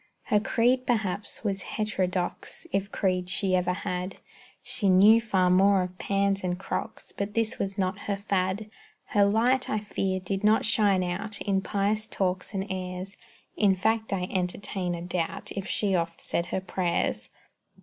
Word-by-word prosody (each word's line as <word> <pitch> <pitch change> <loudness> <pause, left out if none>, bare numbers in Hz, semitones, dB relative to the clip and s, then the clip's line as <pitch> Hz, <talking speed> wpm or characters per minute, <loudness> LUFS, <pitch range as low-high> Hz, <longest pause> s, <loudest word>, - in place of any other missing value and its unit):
Her 210 - +2
creed, 245 +4 +2
perhaps, 210 -4 -1
was 195 -3 -1
heterodox, 185 -4 -2
If 195 0 -1
creed 185 -2 0
she 190 0 +1
ever 180 0 +1
had. 180 0 -4 0.5
She 205 -5 +2
knew 205 +5 +7
far 190 -5 +2
more 195 +1 +5
of 180 0 -8
pans 200 0 0
and 180 -1 -1
crocks, 215 +3 -5
But 200 +1 -4
this 230 +1 0
was 195 0 -2
not 190 0 -1
her 200 0 -2
fad; 200 +1 -1 0.3
Her 205 -1 +3
light, 240 +6 +2
I 215 - +1
fear, 195 -2 -2
did 195 +2 -3
not 215 +1 +4
shine 205 -4 +3
out 200 +4 -3
In 195 -1 +1
pious 210 +2 0
talk 185 -1 -1
and 195 -2 -2
airs, 185 0 -5 0.4
In 200 -3 +4
fact 220 +4 0
I 190 -2 0
entertain 185 0 -2
a 170 - -6
doubt 175 -2 -3
If 195 0 -4
she 200 -2 +1
oft 170 -2 -1
said 170 - -1
her 190 - -2
prayers. 175 - -1
195 Hz, 165 wpm, -27 LUFS, 185-210 Hz, 0.5 s, knew